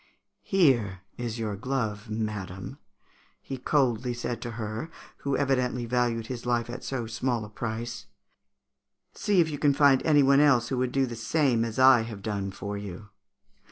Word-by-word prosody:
'Here 120 - +2
is 120 -1 -4
your 110 -3 -2
glove, 110 -2 -3
madam,' 105 -4 -4 0.6
he 135 - -6
coldly 125 -3 +1
said 120 -1 -4
to 120 - -5
her 110 +7 -4 0.3
who 140 -1 -1
evidently 125 -3 0
valued 120 -1 0
his 120 0 -6
life 120 -1 0
at 125 +1 -7
so 130 -4 -3
small 115 0 -2
a - - -11
price; 115 -1 -5 1.1
'see 205 -3 +1
if 160 - +1
you 145 - -5
can 145 -2 +3
find 140 -2 +5
any 145 -3 +5
one 135 +1 +5
else 140 -5 +4
who 130 - -1
would 125 -1 0
do 135 0 +2
the 120 -2 -6
same 115 +1 +1
as 115 0 -4
I 130 -2 +7
have 110 -3 -7
done 100 -2 -2
for 100 +1 -5
you.' 100 +1 -8
120 Hz, 170 wpm, -27 LUFS, 110-135 Hz, 1.1 s, I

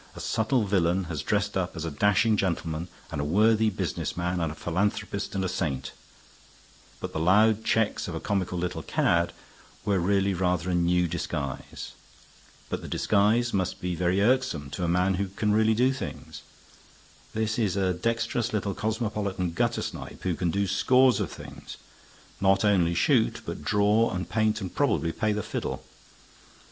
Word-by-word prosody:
A - - -8
subtle 115 +2 +1
villain 95 -1 +2
has 80 -4 -4
dressed 105 -1 0
up 90 -1 -1
as 80 -1 -4
a 80 - -3
dashing 105 +7 +3
gentleman 85 -4 -2 0.2
and 75 -3 -2
a - - -1
worthy 110 +7 +3
business 95 - -3
man 90 +1 -1
and 80 -3 -1
a - - -8
philanthropist 100 +4 -2
and 95 -1 0
a - - +1
saint; 75 -7 -2 1.1
but - - -6
the - - -2
loud 105 +6 +4
checks 110 -2 +1
of 85 - -5
a - - -3
comical 95 -2 -1
little 90 -1 -2
cad 85 +2 +1 0.5
were 100 -3 +2
really 100 +2 +2
rather 90 -1 0
a - - 0
new 90 0 +2
disguise. 75 -4 -4 0.8
But - - -3
the - - -8
disguise 110 +4 +2
must 95 -2 -1
be 90 0 -2
very 90 +3 +1
irksome 115 - +1
to 90 - -4
a - - +1
man 90 +3 +2
who 100 - -1
can 105 +3 -1
really 110 +1 +3
do 130 +3 +3
things. 130 - -7 0.9
This 110 +1 0
is 105 -5 +1
a 95 -2 +1
dexterous 115 +4 -1
little 100 -2 -1
cosmopolitan 105 -4 -2
guttersnipe 85 - -3
who 90 - 0
can 85 +1 -1
do 100 +4 0
scores 130 +5 +4
of - - -2
things, - - -10 0.6
not 95 +1 +3
only 90 -5 +3
shoot, - - +2
but - - -6
draw 105 +3 +3
and 90 -2 -3
paint, 110 +3 +1
and 95 -3 -5
probably 85 - +1
play 110 +5 0
the 105 -1 -1
fiddle. - - -4
95 Hz, 170 wpm, -27 LUFS, 85-110 Hz, 1.1 s, loud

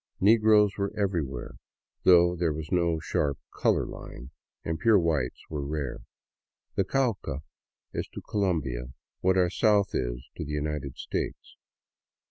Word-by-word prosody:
Negroes 105 -1 +5
were 100 0 0
everywhere, 85 - -2 0.5
though 90 -1 +6
there 85 -2 +1
was 80 +2 -6
no 85 -3 +2
sharp 70 -2 0
" - - -29
color - - +3
line," 65 +2 -9 0.3
and 80 0 -2
pure 115 -2 +5
whites 80 -8 0
were 75 -3 -4
rare. 70 -2 -3 0.7
The 100 - +2
Cauca 100 - -1 0.5
is - - -3
to - - -5
Colombia 70 - -1 0.3
what 95 +1 +2
our 90 -2 +3
South 105 -2 +3
is - - -2
to - - -3
the 75 0 -5
United 75 -2 -3
States. - - -4
85 Hz, 140 wpm, -28 LUFS, 70-100 Hz, 0.7 s, though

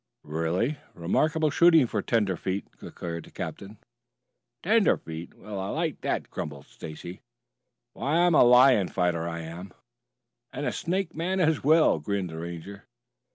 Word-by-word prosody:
"Really 80 - -1 0.2
remarkable 155 - +1
shooting 165 -3 +6
for 110 -3 -2
tenderfeet," 100 -3 -1
declared 85 -1 -7
the - - -15
captain. 100 +2 -7 0.9
"Tenderfeet? 165 - +1
Well, 105 -1 -7
I 95 - -3
like - - -2
that!" - - -2
grumbled 75 -3 -6
Stacy. 85 +3 -9 0.7
"Why, 145 +4 -1
I'm 175 -1 +4
a - - +7
lion 125 -4 +6
fighter, 85 -2 -1
I 85 0 -5
am!" 85 +4 -8 0.8
"And 145 +3 -4
a - - 0
snake 180 +1 -2
man 180 +4 -1
as 160 -4 +2
well," 155 - +4
grinned 95 +2 -3
the 80 - -7
Ranger. 85 +4 -8
100 Hz, 140 wpm, -27 LUFS, -, 0.9 s, a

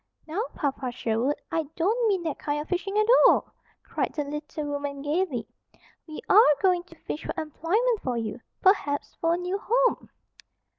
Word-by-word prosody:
"Now, 330 +6 -2
Papa 270 -4 -2
Sherwood, 240 +4 0 0.2
I 325 - +1
don't 445 +8 +1
mean 385 -4 +1
that 320 -3 -3
kind 290 0 -2
of 295 - -5
fishing 390 +3 -2
at 430 - +4 0.2
all!" - - +2 0.3
cried - - -2
the 295 - -1
little 295 +1 -5
woman 285 -1 -4
gaily. 295 -5 -1 0.6
"We 310 - -7
are 395 -8 +7
going 365 -2 +3
to - - -16
fish 305 - -6
for - - -4
employment 400 - 0
for 250 -2 -2
you, 225 +1 -4 0.2
perhaps 335 -7 +2
for 330 0 +3
a - - -3
new 360 +2 -2
home." - - +1
320 Hz, 175 wpm, -26 LUFS, 285-385 Hz, 0.6 s, are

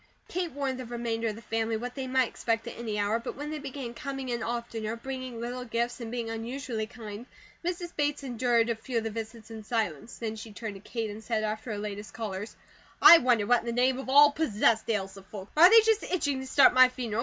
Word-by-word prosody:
Kate 355 -2 -3
warned 270 -2 -2
the 255 - -5
remainder 230 -1 -2
of 215 - -2
the 230 - -12
family 225 0 -1
what 245 +2 -5
they 265 0 -5
might 260 -1 +2
expect 230 0 -2
at 235 - -7
any 225 -3 -4
hour; 205 +2 +1
but 230 - -6
when 295 +2 -5
they 310 - -4
began 270 -4 -6
coming 270 0 -5
in 240 0 -2
oftener, 230 -1 -3
bringing 255 0 -6
little 245 +2 -4
gifts 235 +1 -2
and 230 - -5
being 235 -1 -3
unusually 225 0 -4
kind, 225 0 -9 0.4
Mrs. 350 0 -4
Bates 290 -1 0
endured 240 -2 +1
a - - -1
few 235 +2 -4
of 225 - 0
the 225 - -3
visits 225 0 -7
in 220 -1 -8
silence, 215 - -2
then 220 -1 -4
she 220 0 -9
turned 215 0 -5
to 195 - -10
Kate 225 0 -4
and 215 +2 -9
said 220 -2 -1
after 215 +2 -3
her 210 - -3
latest 205 0 -6
callers: 210 -2 -5 0.4
"I 340 - +10
wonder 245 -6 +2
what 245 +3 +4
in 235 - -10
the - - 0
name 255 +2 +2
of 265 - -6
all 290 +2 +8
possessed 230 -7 +1
ails 195 -3 -1
the 195 - -11
folks? 195 0 -10
Are 340 +4 +9
they 455 +1 +9
just 445 -1 +2
itching 285 -7 -1
to 265 - -6
start 280 - +6
my 255 0 +7
funeral? 240 -4 -4
235 Hz, 240 wpm, -28 LUFS, 220-260 Hz, 0.4 s, I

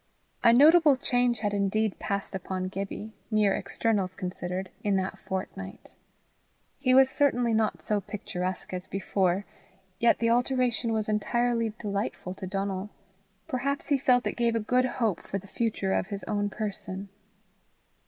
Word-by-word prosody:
A 235 - +8
notable 300 +3 +7
change 245 -2 +1
had 205 -1 0
indeed 205 +1 0
passed 200 0 -3
upon 185 0 -3
Gibbie, 200 +3 -5 0.2
mere 210 -3 +3
externals 200 -5 0
considered, 180 +1 -4
in 205 -2 +2
that 190 0 -2
fortnight. 145 - -6 0.9
He 255 0 +3
was 265 0 +8
certainly 245 -5 +2
not 220 -1 0
so 210 -1 0
picturesque 185 -3 -4
as 180 0 -5
before, 195 0 0 0.5
yet 235 - +4
the 230 0 +2
alteration 245 -1 +1
was 220 -1 0
entirely 230 +2 +1
delightful 200 -3 -3
to 190 0 -7
Donal. 195 +1 -2 0.6
Perhaps 280 0 -2
he 285 -2 +3
felt 250 -2 +3
it - - +1
gave 235 -1 +2
a - - +2
good 250 +4 +2
hope 230 -7 0
for 195 - -4
the 195 - -9
future 205 -2 -1
of - - 0
his 200 -1 -5
own 205 -1 -1
person. 200 -2 -5
210 Hz, 150 wpm, -28 LUFS, 190-240 Hz, 0.9 s, A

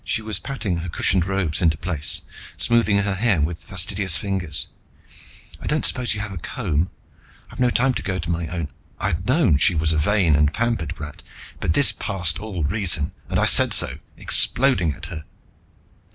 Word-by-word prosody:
She 110 - -2
was 110 -1 -2
patting 115 -10 -3
her 85 +1 -5
crushed 90 +2 +2
robes 95 -4 -1
into 80 -3 +2
place, 80 -3 -3 0.3
smoothing 115 -3 +2
her 100 0 0
hair 100 -2 +1
with 80 +3 -2
fastidious 95 -5 0
fingers. 95 -6 -3 0.9
"I - - -8
don't - - 0
suppose 125 -4 +1
you 105 - -5
have 105 -2 -6
a 90 - -6
comb? 80 +2 -2 0.6
I've - - -12
no 125 -1 +3
time 130 +2 +1
to - - -3
go 95 -2 -3
to 85 -1 -3
my 85 -1 -2
own 85 -2 -4 0.2
" - - -34
I'd 90 +4 -2
known 130 - +3
she 90 +5 +4
was 80 +1 +1
a 75 - 0
vain 90 -1 +2
and 75 0 +2
pampered 115 -5 -2
brat, 75 0 -9 0.4
but 80 - 0
this 140 - +5
passed 90 -4 -1
all 95 -5 -5
reason, 85 -2 +1 0.2
and - - -1
I - - +2
said - - +6
so, - - +4 0.2
exploding 125 - +3
at - - -9
her. 80 -1 -7
90 Hz, 190 wpm, -22 LUFS, 80-105 Hz, 0.9 s, said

